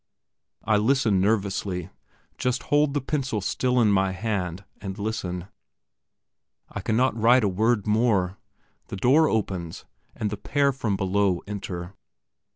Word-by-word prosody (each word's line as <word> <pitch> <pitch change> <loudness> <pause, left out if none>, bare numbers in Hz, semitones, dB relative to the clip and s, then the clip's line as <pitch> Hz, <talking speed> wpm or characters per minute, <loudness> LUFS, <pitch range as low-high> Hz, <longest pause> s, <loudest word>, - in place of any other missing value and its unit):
I 110 - +3
listen 110 -3 +2
nervously, 100 -3 -1 0.5
just 125 0 -1
hold 145 0 +2
the 145 - +1
pencil 135 -5 -2
still 125 +5 0
in 110 -3 +4
my 95 -1 +2
hand, 95 -2 -3 0.2
and 95 -1 -5
listen. 95 -4 -3 1.2
I - - -6
cannot 125 +3 +1
write 120 +2 +4
a - - +3
word 105 +3 +1
more. 105 -4 +2 0.5
The - - -6
door 145 +10 +4
opens 95 -6 -3 0.3
and 105 -2 -2
the 105 - -3
pair 140 +5 +1
from 120 -7 -2
below 95 -1 +1
enter. 95 -3 -6
105 Hz, 135 wpm, -25 LUFS, 95-120 Hz, 1.2 s, in